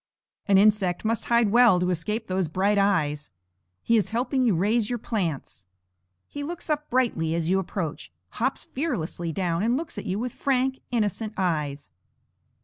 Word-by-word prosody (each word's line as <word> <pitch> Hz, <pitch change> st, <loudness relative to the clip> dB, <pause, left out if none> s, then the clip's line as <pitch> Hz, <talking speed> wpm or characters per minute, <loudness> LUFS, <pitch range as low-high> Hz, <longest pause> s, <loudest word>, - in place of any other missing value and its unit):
An 200 Hz, -1 st, +5 dB
insect 200 Hz, -2 st, +3 dB
must 225 Hz, +1 st, 0 dB
hide 235 Hz, -3 st, +3 dB
well 235 Hz, -5 st, +6 dB
to 180 Hz, 0 st, +1 dB
escape 210 Hz, +7 st, -2 dB
those 185 Hz, -3 st, -1 dB
bright 195 Hz, +5 st, +1 dB
eyes. 155 Hz, -7 st, +1 dB, 0.5 s
He 230 Hz, -, +3 dB
is 210 Hz, -, 0 dB
helping 250 Hz, +4 st, 0 dB
you 225 Hz, -7 st, +3 dB
raise 210 Hz, +5 st, +1 dB
your 245 Hz, -, -1 dB
plants. 170 Hz, -, -4 dB, 0.6 s
He 290 Hz, -, -7 dB
looks 325 Hz, +2 st, -5 dB
up 300 Hz, 0 st, -2 dB
brightly 220 Hz, -11 st, +1 dB
as 170 Hz, +1 st, -1 dB
you 190 Hz, -, +3 dB
approach, 170 Hz, -, -4 dB, 0.2 s
hops 260 Hz, +4 st, -2 dB
fearlessly 185 Hz, -, -3 dB
down 175 Hz, -1 st, -1 dB
and 235 Hz, +4 st, +2 dB
looks 330 Hz, +2 st, -5 dB
at -, -, -8 dB
you 190 Hz, +1 st, -1 dB
with 245 Hz, +2 st, -3 dB
frank, 265 Hz, -1 st, 0 dB
innocent 220 Hz, -2 st, -1 dB
eyes. 150 Hz, -6 st, -2 dB
205 Hz, 165 wpm, -25 LUFS, 175-240 Hz, 0.6 s, well